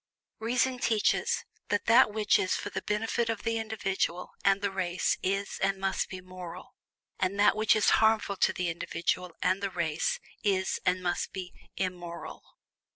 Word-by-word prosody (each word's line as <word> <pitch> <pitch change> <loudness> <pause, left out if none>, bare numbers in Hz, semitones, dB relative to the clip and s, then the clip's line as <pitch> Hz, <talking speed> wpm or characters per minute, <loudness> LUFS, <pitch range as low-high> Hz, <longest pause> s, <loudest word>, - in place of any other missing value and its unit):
Reason 250 +3 +1
teaches 220 -3 +1 0.2
that 205 -1 0
that 230 0 +6
which 210 0 +3
is 185 - +1
for 205 - -4
the - - -3
benefit 225 +2 -1
of 220 -2 -2
the 230 0 0
individual 195 -5 -2
and 195 0 +4
the 200 -1 -1
race 180 -2 0
is 195 +2 -1
and 195 0 +2
must 195 0 -1
be 185 -1 -7
"moral," 180 -2 -9 0.5
and 190 +2 0
that 205 - +5
which 215 0 +4
is 215 - +4
harmful 220 -2 +3
to - - +3
the 180 -1 -2
individual 170 +2 -2
and 185 +2 +2
the 200 - -1
race 165 -4 -1 0.2
is 190 -2 +1
and 185 0 +2
must 175 -1 -1
be 185 -2 -6 0.2
"immoral." 175 -2 -4
195 Hz, 165 wpm, -29 LUFS, 180-215 Hz, 0.5 s, that